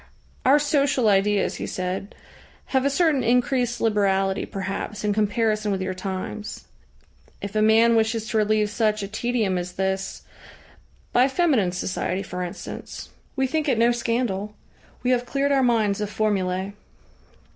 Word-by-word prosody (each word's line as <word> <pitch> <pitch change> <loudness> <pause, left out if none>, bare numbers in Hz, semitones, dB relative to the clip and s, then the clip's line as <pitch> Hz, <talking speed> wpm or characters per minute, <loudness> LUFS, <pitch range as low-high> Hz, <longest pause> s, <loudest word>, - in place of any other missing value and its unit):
"Our 275 +3 +7
social 285 -5 +2
ideas," 200 0 +2
he - - -4
said, 185 +3 -4 0.6
"have 265 0 +2
a - - +4
certain 295 -2 +2
increased 245 0 +1
liberality, 195 -3 +1
perhaps, 195 +1 -4
in 210 -1 +1
comparison 215 0 +1
with 195 - -1
your 185 0 -2
times. 190 +3 -5 0.7
If 200 +1 -7
a 215 - +3
man 225 +2 +5
wishes 220 0 +1
to 225 - 0
relieve 215 0 +2
such 215 -2 0
a - - -3
tedium 220 -3 -1
as 180 0 -5
this 190 +1 -2 0.9
by 250 +2 +5
feminine 270 - +2
society, 185 +1 -2
for 180 -1 -6
instance. 175 -1 -7 0.3
We 265 -1 +1
think 305 +2 -1
it 250 - +2
no 235 +1 +4
scandal. 230 -4 -2 0.5
We 250 - +2
have 245 -1 +1
cleared 280 +3 0
our 275 -1 +3
minds 220 -5 +2
of 210 - -2
formulae. 195 -3 -1
215 Hz, 150 wpm, -24 LUFS, 195-245 Hz, 0.9 s, Our